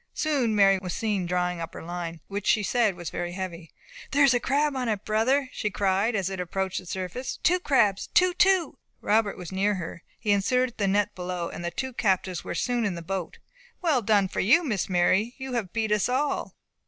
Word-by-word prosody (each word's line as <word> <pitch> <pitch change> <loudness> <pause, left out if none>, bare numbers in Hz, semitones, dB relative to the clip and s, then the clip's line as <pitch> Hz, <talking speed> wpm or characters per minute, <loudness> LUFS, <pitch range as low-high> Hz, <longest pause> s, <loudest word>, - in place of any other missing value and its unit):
Soon 270 -8 +1
Mary 195 -2 +5
was 180 -2 -4
seen 205 -5 -1
drawing 180 0 -1
up 165 - -6
her - - -7
line, 170 -1 -5
which 200 -1 -4
she 210 - +3
said 220 -2 +2
was 175 -2 -6
very 175 0 -4
heavy. 175 -3 -6 0.4
"There 285 +1 +3
is 275 -2 +6
a 245 - +2
crab 285 +3 +1
on 250 -3 -1
it, 210 -2 -2
brother!" 255 +6 +1
she 210 - -2
cried, 200 +3 +1
as 195 -3 0
it 190 -1 -4
approached 190 +1 -2
the 185 - -13
surface; 190 +8 -4
"two 360 +2 +4
crabs! 210 - +2
two! 365 0 +3
two!" 375 -1 +2 0.2
Robert 210 -1 +1
was 180 -1 -8
near 200 +2 +1
her. 170 -2 -6 0.2
He 210 - -1
inserted 240 +5 +1
the 200 - +2
net 205 +1 +1
below, 180 -2 -4
and - - -7
the 170 - -1
two 260 +9 -4
captives 190 -5 0
were - - -5
soon 245 -1 0
in 200 -5 -1
the 170 - -7
boat. 185 -1 -4 0.5
"Well 305 -8 +3
done 205 -2 +3
for - - -5
you, 270 - +5
Miss 215 - -1
Mary; 190 +6 +2
you 265 -1 -6
have 220 -7 -2
beat 220 -2 -1
us 210 +2 +2
all!" 275 +3 -1
205 Hz, 215 wpm, -26 LUFS, 185-245 Hz, 0.5 s, is